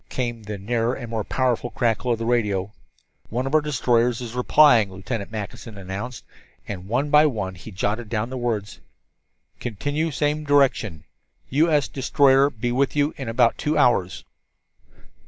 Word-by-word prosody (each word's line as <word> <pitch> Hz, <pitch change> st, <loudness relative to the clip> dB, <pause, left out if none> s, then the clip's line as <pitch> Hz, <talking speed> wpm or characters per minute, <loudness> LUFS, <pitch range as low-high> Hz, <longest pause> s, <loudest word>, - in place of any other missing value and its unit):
Came 120 Hz, -3 st, -3 dB
the 105 Hz, -1 st, -6 dB
nearer 115 Hz, +4 st, -1 dB
and 120 Hz, -3 st, -7 dB
more 110 Hz, -2 st, -2 dB
powerful 125 Hz, 0 st, 0 dB
crackle 120 Hz, +1 st, 0 dB
of 115 Hz, -, +1 dB
the 115 Hz, -, -4 dB
radio. 105 Hz, -5 st, 0 dB, 0.6 s
"One 125 Hz, +3 st, -2 dB
of 135 Hz, -, -4 dB
our 155 Hz, -, +5 dB
destroyers 125 Hz, -5 st, +1 dB
is 120 Hz, -2 st, -6 dB
replying," 125 Hz, -3 st, +5 dB
Lieutenant 100 Hz, +3 st, -5 dB
Mackinson 110 Hz, 0 st, -7 dB
announced, 100 Hz, +5 st, -6 dB, 0.4 s
and 95 Hz, -2 st, -6 dB
one 135 Hz, +7 st, -1 dB
by 150 Hz, +1 st, +6 dB
one 105 Hz, -9 st, -3 dB
he 90 Hz, +4 st, -11 dB
jotted 105 Hz, +3 st, -3 dB
down 115 Hz, +2 st, -2 dB
the -, -, -4 dB
words: 115 Hz, -4 st, -3 dB, 0.8 s
"Continue 145 Hz, +8 st, -2 dB
same 150 Hz, +1 st, -1 dB
direction. 135 Hz, -, +2 dB, 0.5 s
U. 155 Hz, +5 st, +3 dB
S. 150 Hz, -2 st, +2 dB
destroyer 135 Hz, 0 st, +3 dB
be 120 Hz, -1 st, -3 dB
with 135 Hz, +3 st, 0 dB
you 145 Hz, +1 st, +1 dB
in 135 Hz, -4 st, -6 dB
about 115 Hz, 0 st, +2 dB
two 150 Hz, +1 st, 0 dB
hours." 95 Hz, -7 st, +2 dB
120 Hz, 160 wpm, -23 LUFS, 105-135 Hz, 0.8 s, by